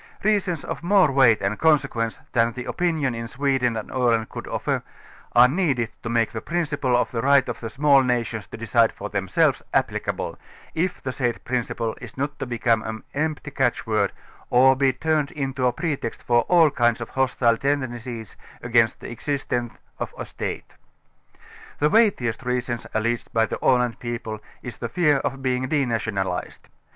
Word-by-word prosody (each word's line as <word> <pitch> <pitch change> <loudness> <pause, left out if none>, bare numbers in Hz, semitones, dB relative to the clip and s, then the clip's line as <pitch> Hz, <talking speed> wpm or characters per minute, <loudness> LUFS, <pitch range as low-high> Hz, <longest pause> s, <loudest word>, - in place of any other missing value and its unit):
Reasons 195 -6 +1
of - - -5
more 180 -3 +4
weight 125 -5 +5
and 100 +2 -1
consequence, 135 -8 +2
than 115 -1 +2
the 125 +1 -6
opinion 160 -7 0
in 115 0 -5
Sweden 130 -2 0
and 110 - -6
Aland 120 -3 +1
could - - -7
offer, - - -1 0.5
are 120 +1 +8
needed 135 -7 0
to 115 - -5
make 115 -1 +1
the 110 - -5
principle 150 -7 0
of 125 - 0
the 115 - -2
right 140 +1 +4
of - - -4
the 115 - -5
small 140 +2 +4
nations 120 -4 -1
to - - -9
decide 115 0 +3
for 105 - -7
themselves 95 -2 +1
applic - - 0
able, - - -3 0.3
if 180 +3 -2
the 130 - -2
said 120 -3 -2
principle 115 -2 -2
is - - -10
not 145 +2 -3
to - - -3
become 115 -1 +1
an 110 0 -6
empty 155 0 -2
catch 130 -3 0
word 110 -3 +1 0.4
or 130 +2 +6
be 135 0 +3
turned 155 +1 0
into 135 -4 -1
a - - +3
pretext 145 -3 -3
for 120 0 +3
all 165 -4 +6
kinds 120 -4 +2
of 120 - -6
hostile 125 -3 +2
tendencies 120 -5 -3 0.3
against 115 -2 +2
the - - -7
existence 120 -1 -3 0.2
of - - -5
a - - -5
State. - - -6 1.0
The 150 +1 +2
weightiest 200 - +3
reason, 125 -1 -2 0.2
alleged 115 +2 -1
by 115 0 +3
the - - -6
Aland 125 -2 +2
people, 120 -2 -5 0.2
i& 125 - -5
the 115 0 -6
fear 150 +1 +3
of 135 0 -3
being 130 0 0
denationalized. 110 -9 -2
125 Hz, 175 wpm, -24 LUFS, 115-140 Hz, 1.0 s, are